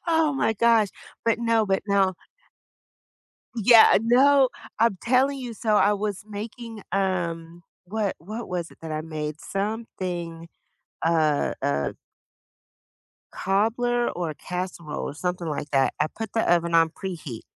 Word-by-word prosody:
Oh 320 -3 +3
my 270 -4 +1
gosh, 225 -1 +4 0.4
but 230 0 +2
no 230 -2 +2
but 195 -1 +1
no. 195 -2 +2 1.4
Yeah, 225 0 +7
no, 260 +3 +5 0.3
I'm 225 -4 +3
telling 260 +3 +2
you, 245 -2 -6
so, 215 0 0
I 205 0 +4
was 205 -1 -3
making, 220 +1 -7
um 175 -3 -2 0.2
what 205 +1 -2
what 215 +8 -7
was 175 -2 -4
it - - -17
that 160 - -6
I 155 0 -2
made? 155 -1 -5
Something 185 -5 -4 0.6
a 160 -3 +2
a 70 -1 -1 1.4
cobbler, 240 +5 +1
or 170 -3 -2
a - - -10
casserole, 180 -4 -5
or - - -7
something 180 +1 -3
like 150 -1 -4
that, 135 -2 +2
I 150 - +2
put 225 -2 -6
the 225 - +2
oven 170 -1 +2
on 165 -1 +5
preheat. 160 - -7
195 Hz, 140 wpm, -25 LUFS, 165-230 Hz, 1.4 s, Yeah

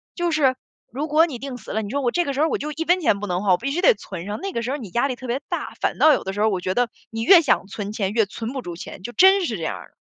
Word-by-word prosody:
就 345 -1 -1
是 275 -4 +3 0.4
如 280 +6 -3
果 310 +2 +4
你 260 -6 -6
定 270 0 -6
死 215 - -14
了， 220 - -1
你 200 - -6
说 285 0 -1
我 245 - +1
这 350 0 +1
个 280 - -2
时 280 - -1
候 315 - +4
我 - - 0
就 300 +1 -5
1 320 +2 -3
分 355 +2 +3
钱 205 -9 +2
不 205 - -5
能 180 +2 -2
花， 195 - +2
我 180 - +5
必 260 +7 -3
须 350 +5 -1
得 - - +6
存 175 -4 -8
上， 205 +1 -4
那 390 0 -3
个 235 - -2
时 250 - -2
候 290 - -1
你 220 -9 -8
压 240 +8 +1
力 255 - -3
特 255 0 -9
别 245 +3 -1
大， - - -4
反 - - -1
倒 310 - +7
有 - - -1
的 190 - -4
时 205 - -3
候 220 - +4
我 190 -3 -1
觉 185 +1 -2
得， 245 -1 +1 0.2
你 225 0 -4
越 345 +8 +7
想 195 -8 +1
存 205 0 -5
钱 200 -3 -1
越 225 -1 +3
存 225 +4 -6
不 265 -2 -4
住 175 -1 -6
钱， 185 +2 -9
就 240 - -6
真 380 +2 +5
是 220 - -3
这 165 - -8
样 - - -2
儿 - - -13
的。 - - -42
245 Hz, 380 characters per minute, -22 LUFS, 205-300 Hz, 0.4 s, 倒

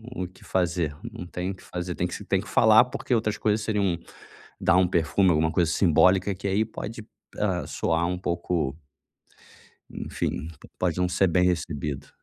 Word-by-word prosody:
o 90 -1 -3
que 90 - -19
fazer, 85 -5 0 0.2
não 90 - -8
tem 90 +2 -3
o - - -7
que - - -18
fazer. 90 0 -4
Tem 90 - -1
que - - -6
se 105 - -8
tem 95 -1 +1
que 105 - -12
falar, 110 +2 +6
porque 125 0 -3
outras 110 -2 +1
coisas 105 0 +1
seriam 100 -5 0 0.6
dar 90 - +4
um 90 -1 +4
perfume, 90 +2 +2
alguma 80 0 +2
coisa 85 -2 +2
simbólica, 95 +3 +4
que 100 +2 -4
aí 105 +3 +2
pode, 110 0 -7 0.3
hã, 95 -4 0
soar 80 +1 0
um 90 0 -2
pouco 85 -5 -1 1.2
Enfim, 80 - -4
p - - -14
pode 90 -1 0
não 90 0 +2
ser 95 +1 +2
bem 90 +1 +3
recebido. 75 -5 -2
90 Hz, 185 wpm, -26 LUFS, 85-100 Hz, 1.2 s, falar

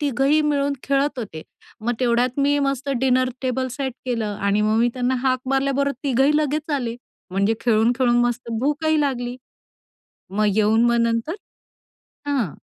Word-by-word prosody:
3घंही 280 +2 +2
मिळून 285 -1 +1
खेळत 280 0 0
होते. 160 -9 -6 0.4
मग 235 +3 -1
तेवढ्यात 245 +1 +1
मी 285 +1 +3
मस्त 275 0 -3
डिनर 255 -1 +2
टेबल 260 0 -1
सेट 265 0 -3
केलं 220 -4 -2
आणि 200 +1 +1
मग 215 +1 +2
मी 240 - +3
त्यांना 255 0 0
हाक 260 -1 +2
मारल्याबरोबर 275 +1 +1
3घंही 270 +2 +3
लगेच 305 +1 -1
आले, 240 -4 -2 0.3
म्हणजे 200 +4 +1
खेळून-खेळून 240 +2 +2
मस्त 240 0 -2
भूकही 305 +3 +1
लागली. 250 -4 -2 1.0
मग 215 +1 +2
येऊन 220 +2 +3
मग 235 0 +3
नंतर 230 +8 0 0.9
हां. 255 - 0
255 Hz, 145 wpm, -22 LUFS, 230-280 Hz, 1.0 s, मी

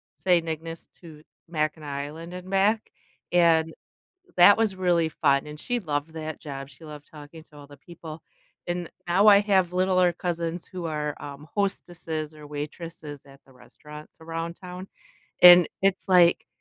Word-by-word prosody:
Saint 175 -3 +1
Ignace 165 +1 -6
to 155 -3 -13 0.3
Mackinac 155 -1 -2 0.2
Island 165 +3 -10
and 180 +1 -9
back, 205 +3 +1 0.4
and 165 -2 +3 0.6
that 200 +4 +8
was 215 -4 +1
really 175 -3 +1
fun, 140 -2 +1
and 150 0 -9
she 245 -1 -2
loved 155 -3 -4
that 155 -1 -6
job, 135 -2 -8
she 150 +4 -15
loved 150 -1 -11
talking 155 +1 -12
to 150 -2 -19
all 145 - -12
the 145 -1 -15
people, 165 0 -11 0.5
and 175 -1 -3 0.2
now 190 +4 +3
I 200 -1 +8
have 190 -4 +1
littler 185 -1 +2
cousins 170 0 -4
who 180 -2 -6
are, 150 -2 -3
um, 145 +1 -10
hostesses 165 -6 -3
or 150 -1 -12
waitresses 150 0 -8
at 140 0 -17
the 135 - -21
restaurants 150 +4 -14
around 165 +1 -5
town, 180 0 -9 0.6
and 175 -1 +9
it's, 195 0 0
like, 175 -2 +4
165 Hz, 160 wpm, -25 LUFS, 150-180 Hz, 0.6 s, and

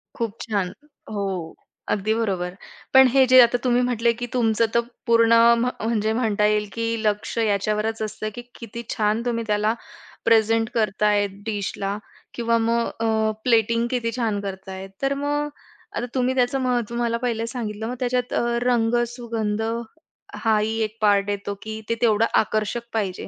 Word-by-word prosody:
खूप 230 -3 -2
छान. 200 -5 -2 0.4
हो, 190 -5 -3 0.3
अगदी 210 +2 +1
बरोबर. 190 -6 -2 0.4
पण 265 0 +8
हे 270 -1 +6
जे 255 +1 +8
आता 240 0 +4
तुम्ही 245 -1 +3
म्हंटले, 235 -2 +2
की 245 +1 -5
तुमचं 230 -2 +2
तर 235 - +4 0.3
पूर्ण 230 0 +5 0.3
म्ह 250 +1 +1
म्हणजे 220 -1 +1
म्हणता 215 -3 +1
येईल, 210 0 +2
की 230 0 -2 0.2
लक्ष 210 +1 -1
याच्यावरच 215 +1 0
असतं, 215 0 -3
की 240 - -6 0.2
किती 235 0 -7
छान 215 +1 +1
तुम्ही 230 -1 -1
त्याला 210 +1 +2 0.5
प्रेझेंट 225 0 +3
करताय 210 -1 +2 0.2
डिशला 200 -1 -3 0.4
किंवा 230 -1 +1
मग 230 +1 +1
अ, 220 -1 +1
प्लेटिंग 230 0 +2
किती 235 -2 -1
छान 220 -4 0
करताय. 190 -1 -6
तर 275 0 +1
मग 290 +1 -1 0.5
आता 235 - -1
तुम्ही 255 0 +1
त्याचं 255 +1 +1
महत्व 240 -2 -1
मला 235 -1 0
पहिले 230 -1 -2
सांगितलं. 220 -3 -4
मग 250 - -3
त्याच्यात 250 0 -1
अ, - - +2 0.2
रंग, 240 -1 +2 0.2
सुगंध 225 -3 -2 0.8
हाही 220 0 +2
एक 215 +1 -4
पार्ट 205 -1 +3
येतो, 205 0 -3
की 220 0 -6
ते 230 - +1
तेवढं 225 -2 +4
आकर्षक 215 +2 -1
पाहिजे. 200 -5 -2
225 Hz, 155 wpm, -23 LUFS, 210-235 Hz, 0.8 s, पण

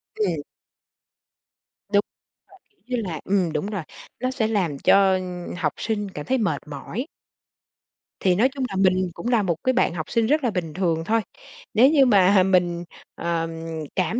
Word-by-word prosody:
Ừm. 175 -8 0 1.5
Đúng. 200 - +6 0.6
Mà - - -47
kiểu - - -42 0.2
như 230 - -1
là 160 - -5
ừm, 185 -4 +1
đúng 150 - -2
rồi, 205 -4 -3 0.4
nó 255 +1 0
sẽ 260 -4 0
làm 185 -10 0
cho, 195 +6 +5
ưm, 180 -1 -4
học 155 -4 0
sinh 210 -3 -2
cảm 150 -5 -7
thấy 260 - +1
mệt 215 - 0
mỏi. 160 - -5 1.1
Thì 185 -2 +3
nói 240 +7 +3
chung 270 0 -5
là - - -5
mình 185 -1 +2
cũng 230 - -6
là 235 -4 +3
một 175 -3 0
cái 255 - +2
bạn 245 - +2
học 160 -3 -5
sinh 230 -2 +2
rất 300 +3 +2
là 240 - +1
bình 170 -5 -3
thường 165 -3 0
thôi. 225 +3 +2 0.5
Nếu 245 +5 +6
như 290 -3 +5
mà 195 -4 +5
mình, 175 -2 +2 0.3
ờ, 170 -1 -1 0.5
cảm 185 +6 0
190 Hz, 180 wpm, -23 LUFS, 175-225 Hz, 1.5 s, Đúng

